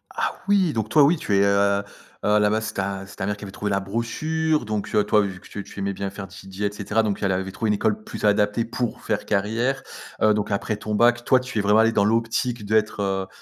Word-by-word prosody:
Ah - - -1
oui, 195 -5 +3
donc 110 -1 -2
toi, 145 +4 +6
oui, 160 +4 +4
tu 105 - -1
es, 100 - +4
heu 100 0 +3 0.4
heu, - - 0
à 105 0 +5
la 105 0 +3
base, 110 0 0
c'est 110 - -5
ta 95 0 -3
c'est 100 - -14
ta - - -2
mère 105 +1 -1
qui 105 - -11
avait 100 - -7
trouvé 105 +1 -3
la 100 -1 +1
brochure 155 +10 -1
donc 105 -1 -3
heu, 105 - +4
toi, 105 0 +3
vu 95 -2 -4
que - - -16
tu 100 - -6
tu - - -11
aimais 100 0 -1
bien 100 0 -4
faire 95 0 -8
DJ 95 +2 -11
et 100 0 +1
cetera 105 +2 0
donc 105 -2 -2
elle 100 -2 +1
avait 95 +1 -2
trouvé 110 +3 -2
une - - +3
école 215 - 0
plus 215 - -8
adaptée 105 +2 +2
pour 120 0 -3
faire 105 -1 -2
carrière. 115 +7 0 0.4
Heu, 110 0 +5
donc 105 0 -1
après 105 +1 -1
ton 105 0 -3
bac, 120 +2 +3
toi, 130 - +5
tu 125 -2 -6
es - - +3
vraiment 105 +2 +4
allé 115 +1 +5
dans 100 -3 +2
l'optique 115 0 0
d'être, 105 0 +1
heu, 95 -1 -1
105 Hz, 270 wpm, -23 LUFS, 100-115 Hz, 0.4 s, toi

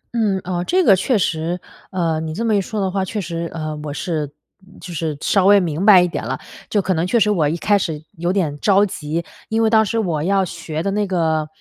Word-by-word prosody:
嗯， 210 -4 +1
哦， 175 -1 -2
这 365 - +2
个 200 - +6
确 220 +6 +1
实， 170 -1 -1 0.3
呃， 165 -4 -1
你 160 0 -4
这 230 +5 -2
么 220 -2 +2
一 200 - +2
说 210 +3 -4
的 190 -2 0
话， 195 0 -1
确 210 +3 -4
实， 170 -2 -4
呃， 155 -2 -4
我 150 -1 -5
是 150 -1 -3 0.5
就 180 - -8
是 155 -2 -3
稍 195 -2 +3
微 200 0 +7
明 175 +1 -1
白 190 -4 +8
一 - - +1
点 175 - -4
了， - - -3 0.3
就 205 -2 +1
可 185 - +1
能 165 +1 0
确 235 +6 +2
实 210 -1 +3
我 160 -7 +2
一 165 - -2
开 205 +3 +2
始 160 -4 -3 0.2
有 175 +1 0
点 160 -7 -1
着 200 +3 +4
急。 165 -3 -4 0.2
因 225 +1 +1
为 220 - +2
当 220 -1 +5
时 220 +2 -2
我 170 -9 0
要 195 +3 +2
学 165 -2 -5
的 195 - -1
那 205 0 0
个， 160 -4 0
180 Hz, 265 characters per minute, -20 LUFS, 160-200 Hz, 0.5 s, 白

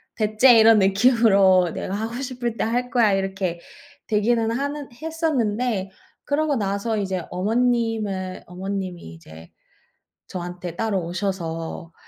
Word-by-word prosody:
'배 215 -1 -2
째.' 245 0 +7
이런 225 0 +7
느낌으로 195 -3 +4
'내가 190 - -5
하고 220 +2 -4
싶을 245 -3 -4
때 - - 0
할거야.' 235 -1 +1
이렇게 190 -2 -2 0.5
되기는 225 +1 +1
하는 285 +3 -3
했었는데 250 - -1 0.3
그러고 290 0 0
나서 200 +1 -1
이제 190 -4 -2
어머님을 215 -2 -1
어머님이 185 0 -5
이제 80 0 -14 0.8
저한테 175 -1 -6
따로 210 -4 -1
오셔서 170 -3 -4
210 Hz, 275 characters per minute, -23 LUFS, 185-235 Hz, 0.8 s, 째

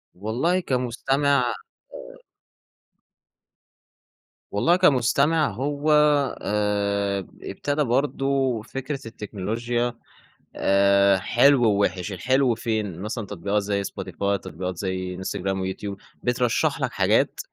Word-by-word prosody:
والله 120 - 0
كمستمع 135 -1 +1 0.5
آآ - - -14 2.3
والله 160 +13 +3
كمستمع 150 -1 +3
هو 145 +7 -1 0.5
آآ 100 -1 0
ب 95 - -14
ابتدا 145 +1 -1
برضه 135 -1 0
فكرة 135 +5 -5
التكنولوجيا 115 +3 -3 0.6
آآ 100 0 +4
حلو 125 +7 +4
ووِحش، 100 -3 +1
الحلو 125 +6 +1
فين؟ 110 -6 -3
مثلًا 105 +2 -4
تطبيقات 100 +2 -1
زي 100 0 -1
Spotify، 100 0 -3
تطبيقات 90 +2 -6
زي 95 -1 -3
إنستجرام 95 +1 -3
ويوتيوب. 95 +1 -4 0.3
بترشّح 125 -1 +1
لك - - 0
حاجات، - - +1
110 Hz, 95 wpm, -24 LUFS, 100-130 Hz, 2.3 s, آآ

